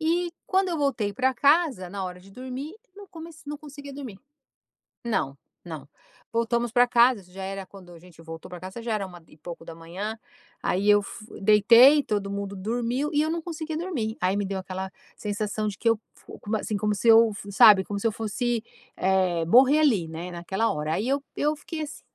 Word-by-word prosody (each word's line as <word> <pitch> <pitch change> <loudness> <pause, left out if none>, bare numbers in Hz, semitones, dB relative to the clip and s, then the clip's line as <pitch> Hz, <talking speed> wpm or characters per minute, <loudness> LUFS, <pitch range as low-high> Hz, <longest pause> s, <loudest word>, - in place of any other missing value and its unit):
E, 340 +2 0
quando 380 0 +2
eu 335 - -1
voltei 245 -8 0
para 260 +4 +1
casa, 280 - +2
na 195 0 -4
hora 180 0 -6
de 195 +2 -17
dormir, 260 - -7 0.2
não 405 -1 -11
comec 330 -3 -11
não 295 0 -4
conseguia 285 -1 -10
dormir. 255 -8 -8 0.9
Não, 140 -12 -1 0.3
não. 155 -5 -8 0.4
Voltamos 235 0 0
para 245 +1 +5
casa, 235 -3 +4
já 190 +1 -8
era 195 0 -5
quando 185 -2 -14
a 170 - -13
gente 170 -2 -17
voltou 165 0 -9
pra 180 -1 -8
casa 190 +6 -8
já 230 -2 -1
era 200 -2 -1
uma 175 -2 -13
e - - -18
pouco 165 +1 -9
da 165 - -8
manhã, 185 +7 -6 0.5
aí 195 +3 0
eu 205 0 +6
f 215 +2 -10 0.2
deitei, 230 +8 +7
todo 205 -4 -2
mundo 200 0 -4
dormiu 240 +8 -2
e 295 - +1
eu 315 - -1
não 335 0 -2
conseguia 320 -2 -5
dormir, 300 -11 -3
aí 185 +2 +1
me 205 - -1
deu 190 0 -3
aquela 190 0 -6 0.3
sensação 210 0 -2
de 205 - -3
que 230 - +1
eu 225 -2 +2 0.2
f - - -17 0.3
assim, 210 -1 -3
como 210 0 0
se 205 +4 -2
eu, 225 0 +7 0.2
sabe, 195 -1 +7
como 200 0 -4
se 230 - -7
eu - - +1
fosse, 225 +2 -2 0.3
eh, 185 -3 +1
morrer 265 - +6
ali, 220 - +3
né, 165 +3 -6
naquela 190 +6 -1
hora, 150 +1 -2
aí 215 +8 -1
eu 280 +1 +2 0.2
eu 300 +1 +1
fiquei, 315 +2 -7
assim 300 - -7
215 Hz, 205 wpm, -26 LUFS, 190-270 Hz, 0.9 s, deitei